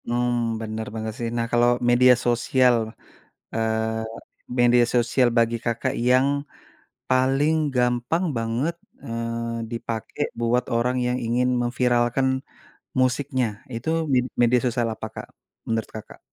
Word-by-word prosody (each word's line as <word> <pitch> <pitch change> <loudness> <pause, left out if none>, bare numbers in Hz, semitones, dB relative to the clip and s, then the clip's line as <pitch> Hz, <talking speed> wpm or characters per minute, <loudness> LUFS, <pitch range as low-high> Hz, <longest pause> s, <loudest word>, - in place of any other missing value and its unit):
Mmm, 120 -1 0
bener 110 0 -4
bener 110 0 -3
sih. 115 -1 -2
Nah, 115 - 0
kalau 120 0 +4 0.2
media 125 +1 +6
sosial, 120 +1 +3 0.8
eee, 110 0 -1 0.6
media 120 0 +5
sosial 120 +1 +3
bagi 115 0 +2
Kakak 115 -1 -1
yang 130 +2 +5 0.8
paling 135 +4 +3 0.2
gampang 125 +7 +1
banget, 115 +8 -1 0.3
eee, 115 0 -3
dipake 115 -1 -5 0.2
buat 120 +1 +1
orang 125 +2 +1
yang 125 0 0
ingin 120 +2 +1
memviralkan 120 +1 +1 0.7
musiknya, 130 0 +1 0.3
itu 115 +7 -3 0.2
med 125 -1 +3 0.2
media 120 +1 +4
sosial 120 -1 0
apa, - - -6
Kak, - - -7 0.4
menurut 115 -1 -1
Kakak? 110 - -11
120 Hz, 120 wpm, -24 LUFS, 115-125 Hz, 0.8 s, media